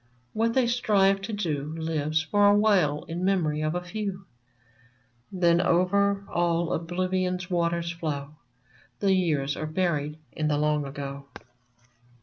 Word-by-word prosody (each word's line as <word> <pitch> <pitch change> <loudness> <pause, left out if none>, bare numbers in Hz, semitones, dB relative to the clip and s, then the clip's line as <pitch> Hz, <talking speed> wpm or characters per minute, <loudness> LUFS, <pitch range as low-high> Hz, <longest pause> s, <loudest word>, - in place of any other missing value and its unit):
What 230 +1 0
they 260 -2 +4
strive 200 -5 +2
to 195 - -5
do 155 -7 -3
Lives 160 -1 -1
for 205 +5 +3
a 205 - +6
while 185 -9 +2
in 170 +2 -5
memory 165 -6 +1
of 155 +2 -1
a 180 - -2
few; 195 0 -5 1.1
Then 175 -2 +3
over 200 +3 +2
all 170 -1 0
Oblivion's 185 +2 -2
waters 170 -1 0
flow 150 -4 -4 0.3
— 125 - -31
The 195 -1 +3
Years 150 -7 +1
are 155 - -4
buried 155 -3 -1 0.2
in 155 - -1
the 150 -1 +1
long 150 -1 +1
ago 140 0 -7
170 Hz, 140 wpm, -26 LUFS, 155-195 Hz, 1.1 s, a